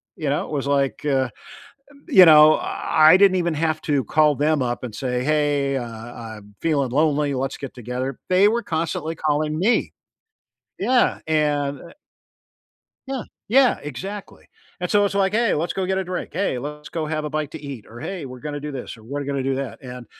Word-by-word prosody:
you 150 -3 -3
know, 145 - 0
it - - -10
was 140 -2 -2
like, 140 -1 0
uh, 135 -3 +1 0.8
you 190 - +8
know, 155 -1 +7
I 160 +2 +4
didn't 195 -1 +5
even 170 -2 0
have 155 0 -1
to 145 -4 +1
call 150 +5 +3
them 150 +1 +1
up 120 0 -2
and 120 -4 -6
say, 125 -1 -2
"Hey, 145 -2 +1
uh, 130 - -3 0.3
I'm 105 -3 -10
feeling 140 -6 0
lonely, 145 0 +1
let's 135 +1 -3
get 135 -2 -7
together," 125 +2 -5
they 185 +2 +5
were 235 +1 -1
constantly 165 0 -2
calling 155 0 -1
me. 220 +6 +1 0.9
Yeah, 245 +5 +2
and 145 -3 0 1.3
Yeah, 270 -3 -3 0.2
yeah, 255 +3 +4
exactly, 190 +9 -8 0.3
and 180 - -2
so 205 -1 +4
it's 200 - -2
like, 195 -1 +2
"Hey, 230 0 +2
let's 165 +3 -1
go 190 -1 -2
get 190 0 -1
a 190 - 0
drink. 180 0 -5
Hey, 180 -7 -1
let's 150 +2 -7
go 160 -2 -3
have 155 0 -2
a 150 - -3
bite 150 -1 -3
to 160 - -8
eat," 140 -6 -8
or, 120 +1 -11
"Hey, 185 -6 -5
we're 125 -1 -9
gonna 145 -1 -5
do 150 +1 -6
this 130 -3 -7
or 110 - -16
we're 140 +5 -4
going 140 0 -3
to 130 - -1
do 135 - 0
that," 135 +1 -5
and 125 -1 -9
150 Hz, 200 wpm, -22 LUFS, 135-170 Hz, 1.3 s, you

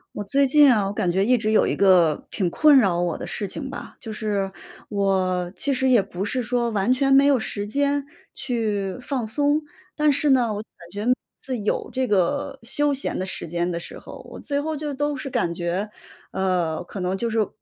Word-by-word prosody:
我 - - -4
最 275 +7 +2
近 290 +1 +6
啊， 210 -3 +1
我 - - -2
感 200 -3 -1
觉 190 +3 +1
一 250 +2 +4
直 215 -1 0
有 220 - +4
一 - - 0
个， 180 -6 +3
挺 185 -4 -1
困 300 - +5
扰 190 -9 +3
我 175 -2 -1
的 - - -6
事 205 - -4
情 265 +8 -5
吧。 - - -8
就 225 - -8
是， 205 -3 -2 0.4
我 185 -3 0
其 280 0 +1
实 265 0 +1
也 245 -4 +5
不 195 0 -5
是 250 +4 -1
说 240 0 0
完 210 +2 +1
全 270 +1 +2
没 275 +1 +6
有 280 -3 +4
时 205 -2 -4
间 280 +5 0 0.3
去 210 -7 -2
放 255 -2 -2
松。 290 +6 +1 0.3
但 300 -1 +3
是 285 +1 +2
呢， 245 -4 +3
我 205 - -4
感 175 -5 -16
觉 210 +6 +1 0.3
自 260 -2 -4
有 210 -1 -2
这 260 0 0
个， 230 +8 0
休 285 +4 0
闲 275 - -2
的 185 - -2
时 190 - -5
间 175 +2 -1
的 170 - -3
时 - - -9
候， - - -11
我 - - -9
最 285 -1 -2
后 310 +2 -2
就 295 -1 -4
都 290 +1 -1
是 275 +1 -5
感 230 -10 -1
觉， 175 +4 -2 0.4
呃， 180 -4 -1
可 195 - -8
能 185 +1 -1
就 235 +3 -2
是， 220 -2 +1
220 Hz, 235 characters per minute, -23 LUFS, 190-270 Hz, 0.4 s, 近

